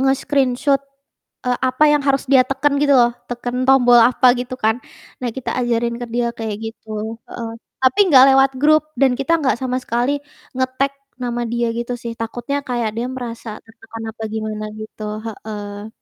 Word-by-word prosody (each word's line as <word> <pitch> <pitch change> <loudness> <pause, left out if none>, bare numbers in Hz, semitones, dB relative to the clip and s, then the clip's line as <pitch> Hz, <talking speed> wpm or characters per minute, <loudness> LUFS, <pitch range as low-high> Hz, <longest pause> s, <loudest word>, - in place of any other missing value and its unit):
nge-screenshoot, 270 0 +1 0.7
eee, 245 - +2
apa 255 +4 +3
yang 295 -1 +3
harus 275 -1 +1
dia 265 -2 +6
teken 275 +2 0
gitu 285 0 +3
loh, 240 -2 +4
teken 245 +1 -3
tombol 250 -2 +6
apa 245 +1 +5
gitu 250 +1 -5
kan. 220 +1 +2 0.4
Nah, 245 -2 -3
kita 260 +1 -4
ajarin 235 -1 0
ke 240 0 -6
dia 240 0 +1
kayak 220 -2 -3
gitu, 220 0 -6
heeh. 230 -2 -6 0.3
Tapi 260 -1 +2
nggak 260 -1 +9
lewat 270 0 +5
grup 310 +2 +5 0.2
dan 265 -2 +4
kita 330 +5 +1
nggak 265 -4 +1
sama 255 0 -2
sekali 250 +4 -1 0.3
ngetag 260 +1 -1 0.2
nama 240 -1 -3
dia 235 0 0
gitu 240 +1 -3
sih, 235 -1 -6
takutnya 240 +5 -3
kayak 235 -3 -1
dia 240 +2 -2
merasa 240 -3 -6 0.2
tertekan 225 0 -11
apa 225 - -11
gimana 215 0 -4
gitu, 215 0 -8 0.2
heeh. 210 -1 -7
245 Hz, 170 wpm, -19 LUFS, 230-265 Hz, 0.7 s, nggak